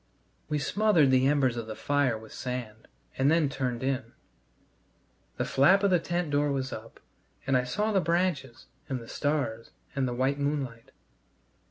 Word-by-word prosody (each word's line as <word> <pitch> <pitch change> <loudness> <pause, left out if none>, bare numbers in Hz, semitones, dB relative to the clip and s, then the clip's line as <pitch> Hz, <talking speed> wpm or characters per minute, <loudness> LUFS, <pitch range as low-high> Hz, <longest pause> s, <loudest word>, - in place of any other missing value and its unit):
We 150 - 0
smothered 170 -2 +3
the 130 0 +4
embers 135 -4 +2
of 115 -1 -4
the 110 - -6
fire 140 -4 +1
with 110 0 -12
sand, 125 -4 -6 0.3
and 135 +2 +4
then 160 -2 +3
turned 130 -3 -3
in. 130 -3 -2 1.2
The - - -1
flap 185 +9 +4
of 200 - +3
the 180 - +4
tent 175 -2 -2
door 145 0 +2
was 130 -1 -2
up, 110 +1 -9 0.5
and 135 0 +1
I 125 0 +2
saw 210 +12 -1
the 195 -2 +3
branches 170 -8 -1 0.2
and 130 -2 -2
the 115 - -11
stars 140 -7 -2 0.3
and 135 -2 +1
the 120 - -3
white 135 +3 0
moonlight. 140 -5 -3
135 Hz, 170 wpm, -28 LUFS, 125-150 Hz, 1.2 s, the